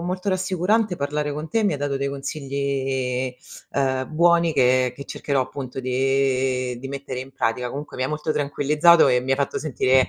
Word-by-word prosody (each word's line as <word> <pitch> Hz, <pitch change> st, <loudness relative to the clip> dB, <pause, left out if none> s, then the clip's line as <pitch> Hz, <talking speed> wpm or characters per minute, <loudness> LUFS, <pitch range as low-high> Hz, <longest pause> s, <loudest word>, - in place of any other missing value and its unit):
molto 185 Hz, +3 st, -3 dB
rassicurante 185 Hz, +2 st, +1 dB
parlare 145 Hz, 0 st, -2 dB
con 150 Hz, +2 st, -5 dB
te. 225 Hz, -1 st, +1 dB
Mi 205 Hz, -, +2 dB
hai 145 Hz, -, -3 dB
dato 140 Hz, -1 st, -1 dB
dei 140 Hz, 0 st, -1 dB
consigli, 135 Hz, -2 st, -2 dB, 0.4 s
uhm, 130 Hz, 0 st, -1 dB
buoni 170 Hz, 0 st, +4 dB
che 130 Hz, -2 st, +3 dB
che 140 Hz, -, -8 dB
cercherò, 140 Hz, -1 st, -1 dB
appunto, 130 Hz, 0 st, -7 dB
di 130 Hz, -1 st, 0 dB
di 135 Hz, -, -6 dB
mettere 135 Hz, -2 st, -5 dB
in 130 Hz, +1 st, -9 dB
pratica. 125 Hz, +1 st, -1 dB
Comunque 145 Hz, +4 st, -7 dB
mi 130 Hz, -, -2 dB
hai 130 Hz, -, 0 dB
molto 150 Hz, 0 st, -2 dB
tranquillizzato 150 Hz, +4 st, +4 dB
e 125 Hz, -1 st, +3 dB
mi 130 Hz, +1 st, -5 dB
hai 135 Hz, -, +3 dB
fatto 140 Hz, -1 st, -1 dB
sentire 130 Hz, -3 st, +2 dB
140 Hz, 185 wpm, -23 LUFS, 130-150 Hz, 0.4 s, buoni